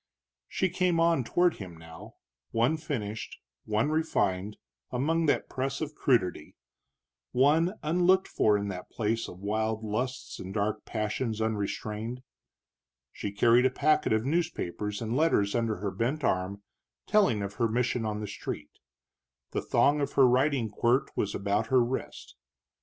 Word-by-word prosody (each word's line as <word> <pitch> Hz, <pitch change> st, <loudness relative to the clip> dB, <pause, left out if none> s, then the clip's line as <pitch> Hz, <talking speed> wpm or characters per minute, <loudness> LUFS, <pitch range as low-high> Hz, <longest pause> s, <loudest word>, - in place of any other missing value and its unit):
She 190 Hz, -, 0 dB
came 180 Hz, -1 st, +1 dB
on 165 Hz, -5 st, +3 dB
toward 175 Hz, +8 st, +2 dB
him 90 Hz, -4 st, -9 dB
now, 80 Hz, 0 st, -12 dB, 0.3 s
one 120 Hz, +7 st, +2 dB
finished, 110 Hz, -9 st, -5 dB, 0.3 s
one 110 Hz, +7 st, +1 dB
refined, 105 Hz, -, 0 dB, 0.3 s
among 160 Hz, +6 st, 0 dB
that 145 Hz, -, +1 dB
press 135 Hz, 0 st, -3 dB
of 155 Hz, -1 st, -4 dB
crudity, 90 Hz, -, 0 dB, 0.8 s
one 155 Hz, +9 st, +3 dB
unlooked 180 Hz, +4 st, +3 dB
for 105 Hz, -1 st, +3 dB
in 100 Hz, 0 st, -3 dB
that 90 Hz, -2 st, -7 dB
place 115 Hz, 0 st, -1 dB
of 90 Hz, -, -10 dB
wild 110 Hz, +1 st, -1 dB
lusts 125 Hz, +5 st, -3 dB
and 95 Hz, +2 st, -7 dB
dark 105 Hz, +1 st, -1 dB
passions 110 Hz, +1 st, -2 dB
unrestrained. 110 Hz, +2 st, -3 dB, 0.9 s
She 100 Hz, -, -5 dB
carried 120 Hz, +5 st, +4 dB
a -, -, 0 dB
packet 150 Hz, +4 st, +2 dB
of 110 Hz, +1 st, +2 dB
newspapers 115 Hz, -, -2 dB
and 115 Hz, +2 st, -2 dB
letters 130 Hz, -10 st, +2 dB
under 115 Hz, -2 st, 0 dB
her 100 Hz, +1 st, -3 dB
bent 135 Hz, +8 st, -2 dB
arm, 95 Hz, +1 st, -1 dB, 0.4 s
telling 195 Hz, -, +3 dB
of 100 Hz, 0 st, -4 dB
her 115 Hz, -, +2 dB
mission 120 Hz, +1 st, 0 dB
on 105 Hz, -1 st, -2 dB
the 105 Hz, -, -4 dB
street; 75 Hz, -6 st, -6 dB, 0.8 s
the -, -, -1 dB
thong 145 Hz, +1 st, +3 dB
of 140 Hz, -, -2 dB
her 135 Hz, -2 st, +6 dB
riding 130 Hz, -2 st, +2 dB
quirt 120 Hz, +5 st, +1 dB
was 100 Hz, -, -1 dB
about 100 Hz, +3 st, 0 dB
her 130 Hz, 0 st, +4 dB
wrist. 125 Hz, +3 st, -5 dB
115 Hz, 150 wpm, -29 LUFS, 105-145 Hz, 0.9 s, her